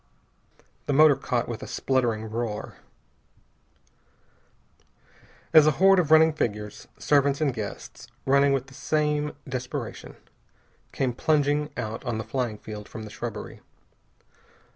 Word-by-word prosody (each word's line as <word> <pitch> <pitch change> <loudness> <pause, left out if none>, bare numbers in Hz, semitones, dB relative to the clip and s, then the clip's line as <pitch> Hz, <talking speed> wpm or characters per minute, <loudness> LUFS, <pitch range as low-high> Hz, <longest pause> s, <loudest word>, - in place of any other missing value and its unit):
The 145 - +1
motor 150 0 +7
caught 125 -2 -2
with 120 -1 -5
a - - -7
spluttering 120 -5 0
roar. 110 -1 -4 2.8
As 155 -1 +8
a 155 - +4
horde 195 0 +6
of 165 -4 0
running 160 0 +6
figures, 105 -7 -4
servants 140 -1 +2
and 145 -4 +1
guests, 110 -3 -7 0.2
running 140 +1 +4
with 135 -2 0
the 135 - -16
same 150 +1 -1
desperation, 130 -2 -5 0.8
came 130 -2 -1
plunging 145 +2 +1
out 110 -2 -4
on 120 -3 -2
the 110 - -3
flying 115 -1 -3
field 105 0 -9
from 110 - -8
the 105 - -9
shrubbery. 110 -1 -7
130 Hz, 125 wpm, -26 LUFS, 110-150 Hz, 2.8 s, As